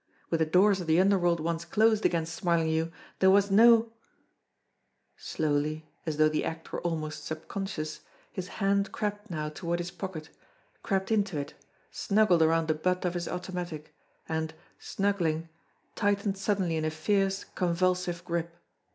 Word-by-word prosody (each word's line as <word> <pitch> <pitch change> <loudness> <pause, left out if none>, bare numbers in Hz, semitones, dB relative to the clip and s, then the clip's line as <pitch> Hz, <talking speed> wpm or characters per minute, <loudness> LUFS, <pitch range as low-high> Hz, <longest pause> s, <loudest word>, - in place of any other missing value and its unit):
With 165 - +1
the 160 - +2
doors 190 +4 +4
of 170 - -6
the 160 +2 +4
underworld 180 -3 +3
once 165 +1 -2
closed 220 +5 +3
against 165 -1 -2
Smarlinghue, 165 -2 +1 0.3
there 190 - +5
was 200 +1 +4
no 230 +2 +6 1.2
Slowly, 155 0 -2 0.2
as 155 -2 -2
though 155 0 +5
the 155 0 0
act 165 0 -5
were - - -3
almost 155 -3 -3
subconscious, 160 0 -5 0.3
his 185 -2 -5
hand 200 +1 0
crept 210 0 -3
now 155 -3 -3
toward 170 +2 -3
his 175 0 -4
pocket, 180 -4 -7 0.5
crept 195 0 -1
into 200 -6 +1
it, 140 - -4 0.4
snuggled 200 -5 +3
around 160 0 +3
the 155 - +3
butt 180 +4 -1
of 175 - 0
his 175 -1 -3
automatic, 180 -4 -5 0.3
and, 160 0 -2 0.2
snuggling, 170 -5 -1 0.4
tightened 200 -1 0
suddenly 195 -4 0
in 155 - -1
a - - +1
fierce, 195 +5 0
convulsive 180 0 -1
grip. 170 -1 -3
175 Hz, 150 wpm, -29 LUFS, 160-195 Hz, 1.2 s, no